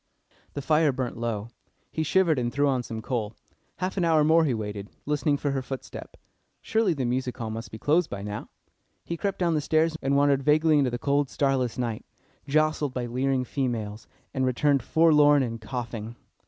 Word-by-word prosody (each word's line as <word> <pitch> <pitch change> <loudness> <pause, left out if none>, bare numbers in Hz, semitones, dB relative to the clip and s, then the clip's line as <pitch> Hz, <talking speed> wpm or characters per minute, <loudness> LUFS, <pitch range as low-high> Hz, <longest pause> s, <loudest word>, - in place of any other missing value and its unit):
The 140 - -5
fire 155 0 +3
burnt 130 -2 -3
low. 115 -2 -3 0.4
He 160 - -2
shivered, 160 -2 +2
and 120 -1 -1
threw 145 +2 +1
on 130 -2 +1
some 110 -2 -7
coal. 110 -4 -3 0.4
Half 185 +2 -3
an 180 - +1
hour 160 -2 +4
more 160 +2 +4
he 135 - +1
waited, 105 -2 -5 0.2
listening 145 0 +1
for 145 0 -1
her 135 -1 -1
footstep. 130 -1 -8 0.4
Surely 220 -6 +1
the 135 -3 -2
music 125 +1 -2
hall 110 -2 -4
must 115 +2 -6
be 110 - -8
closed 155 +8 +2
by 100 0 -5
now. 105 +1 -6 0.6
He 170 - -3
crept 195 +3 -2
down 175 -2 +1
the 155 - +1
stairs, 160 +2 +2
and 140 +1 +1
wandered 140 -1 +3
vaguely 150 +2 +4
into 135 -3 +2
the 120 - -3
cold, 140 +1 +1
starless 135 -4 0
night, 120 -3 -3 0.4
jostled 155 -1 +1
by 125 -1 -2
leering 130 +2 0
females, 115 -6 -3 0.3
and 130 - 0
returned 135 +2 +2
forlorn 150 0 +5
and 115 -2 -4
coughing. 115 -1 -5
135 Hz, 190 wpm, -26 LUFS, 120-150 Hz, 0.6 s, forlorn